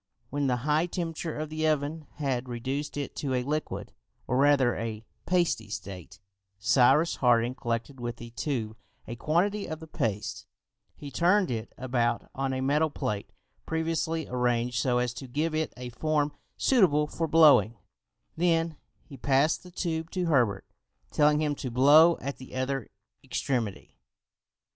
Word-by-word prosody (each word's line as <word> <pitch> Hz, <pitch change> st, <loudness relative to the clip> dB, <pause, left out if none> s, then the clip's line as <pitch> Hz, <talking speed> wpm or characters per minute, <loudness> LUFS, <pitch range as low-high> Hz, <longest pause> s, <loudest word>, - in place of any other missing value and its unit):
When 145 Hz, 0 st, 0 dB
the 125 Hz, -, +2 dB
high 155 Hz, +3 st, +2 dB
temperature 165 Hz, -3 st, -4 dB
of 155 Hz, 0 st, -4 dB
the 155 Hz, 0 st, 0 dB
oven 155 Hz, 0 st, -1 dB
had 130 Hz, -4 st, -2 dB
reduced 135 Hz, +5 st, -3 dB
it 140 Hz, -2 st, -4 dB
to 135 Hz, -3 st, -1 dB
a 125 Hz, -, 0 dB
liquid, 150 Hz, +3 st, -3 dB, 0.3 s
or 125 Hz, -, 0 dB
rather 135 Hz, -3 st, +4 dB
a 115 Hz, -1 st, -5 dB, 0.2 s
pasty 170 Hz, -, +1 dB
state, 90 Hz, -3 st, -8 dB, 0.4 s
Cyrus 130 Hz, -, +4 dB
Harding 120 Hz, -1 st, +3 dB
collected 120 Hz, +2 st, -3 dB
with 120 Hz, -1 st, -4 dB
the 120 Hz, 0 st, -10 dB
tube 115 Hz, -4 st, -3 dB, 0.3 s
a 120 Hz, -, -5 dB
quantity 185 Hz, -, 0 dB
of 155 Hz, -1 st, -5 dB
the 160 Hz, -, -9 dB
paste, 110 Hz, -9 st, -3 dB, 0.5 s
he 145 Hz, -1 st, -9 dB
turned 180 Hz, +1 st, +3 dB
it 115 Hz, -1 st, -4 dB
about 120 Hz, -2 st, -1 dB
on 135 Hz, 0 st, -2 dB
a 130 Hz, 0 st, -2 dB
metal 150 Hz, +4 st, +2 dB
plate 105 Hz, -7 st, -3 dB, 0.4 s
previously 160 Hz, 0 st, -1 dB
arranged 125 Hz, -1 st, 0 dB
so 125 Hz, -1 st, +1 dB
as 125 Hz, -1 st, 0 dB
to 135 Hz, +2 st, -8 dB
give 150 Hz, +6 st, -1 dB
it 155 Hz, 0 st, -1 dB
a 125 Hz, 0 st, -6 dB
form 150 Hz, +3 st, 0 dB, 0.3 s
suitable 175 Hz, -, +4 dB
for 165 Hz, +2 st, -3 dB
blowing, 145 Hz, -9 st, +6 dB, 0.6 s
then 165 Hz, -2 st, +1 dB, 0.3 s
he 140 Hz, -, -12 dB
passed 140 Hz, +4 st, +2 dB
the 180 Hz, -, -13 dB
tube 165 Hz, -2 st, -3 dB
to 180 Hz, 0 st, -2 dB
Herbert, 120 Hz, -, +2 dB, 0.5 s
telling 150 Hz, 0 st, +4 dB
him 150 Hz, -1 st, +1 dB
to 135 Hz, -2 st, -5 dB
blow 145 Hz, +7 st, +6 dB
at 140 Hz, 0 st, -5 dB
the 130 Hz, 0 st, -11 dB
other 130 Hz, -1 st, -2 dB, 0.3 s
extremity. 120 Hz, -6 st, -3 dB
140 Hz, 155 wpm, -28 LUFS, 120-160 Hz, 0.6 s, blowing